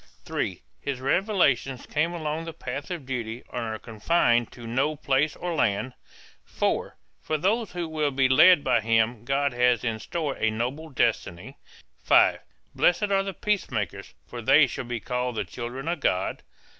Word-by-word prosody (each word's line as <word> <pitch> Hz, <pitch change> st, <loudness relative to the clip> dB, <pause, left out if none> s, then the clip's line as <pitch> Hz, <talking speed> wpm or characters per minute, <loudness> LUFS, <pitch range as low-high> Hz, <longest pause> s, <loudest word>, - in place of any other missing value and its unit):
(3) -, -, -3 dB, 0.2 s
His 140 Hz, -3 st, -4 dB
revelations 135 Hz, -, +1 dB
come 160 Hz, +3 st, 0 dB
along 160 Hz, -1 st, -3 dB
the 165 Hz, -, -6 dB
path 140 Hz, 0 st, -6 dB
of 170 Hz, -7 st, -5 dB
duty 120 Hz, -2 st, -4 dB
and -, -, -2 dB
are 110 Hz, -1 st, -3 dB
confined 120 Hz, +1 st, +1 dB
to 120 Hz, -, -11 dB
no 135 Hz, +7 st, 0 dB
place 145 Hz, +1 st, +1 dB
or 175 Hz, -1 st, -4 dB
land. 125 Hz, -3 st, 0 dB, 0.5 s
(4) -, -, -2 dB, 0.2 s
For 155 Hz, -, -1 dB
those 205 Hz, +6 st, 0 dB
who 175 Hz, -2 st, -3 dB
will 155 Hz, -2 st, 0 dB
be 135 Hz, -1 st, +2 dB
led 160 Hz, +4 st, +6 dB
by 120 Hz, -2 st, +2 dB
him 115 Hz, +1 st, +1 dB
God 140 Hz, +1 st, +1 dB
has 125 Hz, -2 st, +2 dB
in 115 Hz, -2 st, -2 dB
store 155 Hz, -, -3 dB
a 110 Hz, -, +1 dB
noble 125 Hz, +9 st, -3 dB
destiny. 115 Hz, -, -1 dB, 0.4 s
(5) -, -, +5 dB, 0.3 s
Blessed 200 Hz, +4 st, +2 dB
are 195 Hz, 0 st, +3 dB
the 195 Hz, -1 st, -5 dB
peacemakers 110 Hz, -, -2 dB
for 120 Hz, -, -8 dB
they 140 Hz, +5 st, +6 dB
shall 125 Hz, -, -5 dB
be 120 Hz, -1 st, -3 dB
called 125 Hz, +2 st, -2 dB
the -, -, -2 dB
children 125 Hz, +4 st, -6 dB
of 175 Hz, +1 st, -1 dB
God. 90 Hz, +1 st, 0 dB
135 Hz, 170 wpm, -26 LUFS, 120-160 Hz, 0.5 s, led